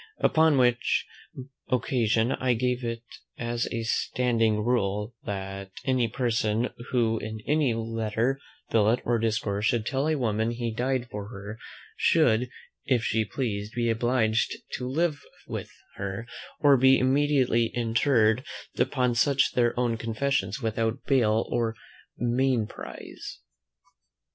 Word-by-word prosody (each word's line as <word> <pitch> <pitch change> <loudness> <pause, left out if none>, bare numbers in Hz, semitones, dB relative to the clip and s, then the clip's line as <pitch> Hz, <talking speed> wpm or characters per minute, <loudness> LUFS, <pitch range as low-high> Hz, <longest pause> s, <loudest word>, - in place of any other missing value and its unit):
Upon 160 -2 +4
which 125 -1 +2 0.6
occasion 120 -2 +1
I 130 -2 +1
gave 125 +1 -1
it 115 0 -3 0.3
as 120 0 -2
a 115 -1 -2
standing 115 -2 +1
rule, 105 -2 0
"That 95 -1 -5 0.2
any 130 -3 +2
person, 115 -1 0 0.2
who 115 -3 +1
in 110 +1 -6
any 145 -6 +2
letter, 115 +3 -1 0.3
billet, 110 +2 +3
or 120 -1 +2
discourse, 110 -2 0
should 115 -3 +1
tell 135 +5 0
a 160 - +2
woman 110 -3 0
he 120 -1 -3
died 125 +1 -1
for 105 -1 -5
her, 105 +1 -8 0.4
should, 125 -7 +3 0.4
if 125 -5 +2
she 110 +1 +1
pleased, 105 -1 -3
be 120 -1 +1
obliged 115 -1 +1 0.2
to 125 - -4
live 155 +1 0 0.2
with - - -5 0.3
her, 100 +3 -4 0.4
or 145 -2 +6
be 130 +1 +6
immediately 130 -3 +2
interred 115 0 +2 0.4
upon 125 -3 +2
such 135 +3 +3
their 120 -1 +1
own 120 -2 +1
confessions 115 -1 -1
without 110 0 -1
bail 115 -5 +3
or 115 -1 0 0.4
mainprize." 120 -2 -2
115 Hz, 125 wpm, -27 LUFS, 110-130 Hz, 0.6 s, or